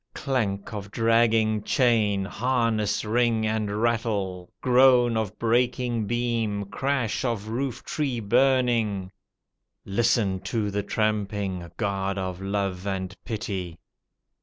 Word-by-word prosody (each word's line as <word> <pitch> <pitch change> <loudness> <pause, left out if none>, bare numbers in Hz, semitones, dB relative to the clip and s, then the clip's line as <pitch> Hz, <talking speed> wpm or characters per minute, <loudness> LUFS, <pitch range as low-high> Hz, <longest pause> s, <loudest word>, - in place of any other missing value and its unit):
Clank 110 -8 -2
of 100 -1 -6
dragging 115 -1 +2
chain, 105 -4 +2
harness 115 -1 0
ring 115 0 +2
and 110 0 -1
rattle, 105 -6 -1
Groan, 125 -2 +5
of 110 -2 -2
breaking 120 -1 +1
beam, 115 -3 -1
crash 130 +2 -1
of 115 -4 -2
roof 125 +2 -3
tree 135 -6 -2
burning. 115 -4 +2 0.7
Listen 100 -2 +1
to 105 +1 -2
the 100 +1 -1
tramping! 100 -4 -2
— - - -47
God 100 -2 -1
of 95 -1 -4
love 100 -1 -2
and 95 -1 -3
pity! 100 -7 -4
110 Hz, 110 wpm, -26 LUFS, 100-120 Hz, 0.7 s, Groan